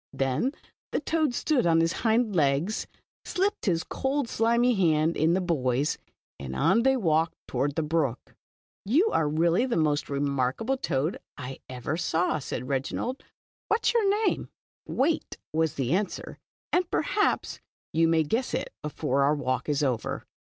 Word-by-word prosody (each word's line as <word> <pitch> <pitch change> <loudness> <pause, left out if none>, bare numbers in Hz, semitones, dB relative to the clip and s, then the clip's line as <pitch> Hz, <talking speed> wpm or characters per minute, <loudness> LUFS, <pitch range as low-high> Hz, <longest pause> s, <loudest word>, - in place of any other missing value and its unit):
" - - -73
Then 135 - 0 0.4
the - - 0
toad 310 -4 0
stood 265 - +1
on 165 -1 +4
his 165 +1 +2
hind 225 -2 +2
legs, 150 +6 +1 0.4
slipped 385 - -1
his 170 -3 +2
cold, 270 -1 -1
slimy 235 +2 +2
hand 165 -5 +2
in 160 +3 +3
the 190 - +1
boy's, 140 -5 0 0.4
and 65 -1 -6
on 225 - +3
they 265 +2 +3
walked 165 -5 +1
toward 145 0 -1
the 160 - 0
brook. 150 -6 0
•' - - -25 0.5
You 305 - +3
are 150 -2 +2
really 170 - +2
the 245 - 0
most 150 -2 +1
remarkable 140 - 0
toad 155 - -1 0.2
I 135 -2 -7
ever 130 +5 -3
saw." 165 -1 0
said 130 - -4
Re^ 135 0 0
inald. 250 - -4 0.2
" - - -
What 435 +2 +1
is - - +5
vour 450 -4 +3 0.2
name?" - - 0 0.4
••\Yait," 305 +5 0 0.2
was 160 -1 +1
the 130 -2 -1
answer, 200 +2 -2 0.2
" - - -52
and 360 -1 +2
perhaps 415 - 0 0.3
you 165 +1 +4
may 165 -1 +3
guess 225 - -1
it - - -4
before 145 -2 -1
our 145 +2 +4
walk 130 -1 -2
is 145 0 +1
over. 125 -5 -1
165 Hz, 170 wpm, -27 LUFS, 140-235 Hz, 0.5 s, is